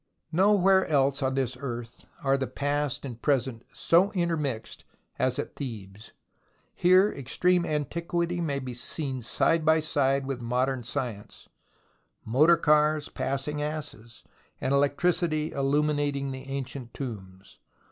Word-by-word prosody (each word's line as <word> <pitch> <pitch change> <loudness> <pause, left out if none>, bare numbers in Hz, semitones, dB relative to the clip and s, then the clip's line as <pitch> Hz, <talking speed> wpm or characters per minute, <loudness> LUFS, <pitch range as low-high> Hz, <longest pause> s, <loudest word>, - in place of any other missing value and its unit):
Nowhere 190 +1 +4
else 140 -1 +2
on 130 0 0
this 130 -2 -1
earth 120 -3 -7 0.2
are 135 0 +3
the 135 -1 -2
past 145 -1 -2
and 120 -3 -8
present 130 -5 0
so 180 +4 +3
intermixed 155 - -2 0.4
as 130 0 +1
at - - -4
Thebes. 110 -5 -8 0.6
Here 185 +3 +4
ex 135 -2 -5
treme 180 -1 +3
antiquity 170 +3 -2
may 145 -4 -1
be 130 -2 -5
seen 130 +1 -3
side 160 +7 +1
by 160 0 +4
side 140 -3 +1
with 135 -2 -4
modern 125 +2 -1
science, 115 -3 -6 0.8
motor 150 +9 +5
cars 150 -1 +3
passing 140 +2 -3
asses, 145 -7 -6 0.4
and 130 - 0
electricity 155 +2 +1
illuminating 145 0 0
the 130 0 -7
ancient 135 -2 -6
tombs. 100 -7 -8
140 Hz, 125 wpm, -27 LUFS, 130-155 Hz, 0.8 s, motor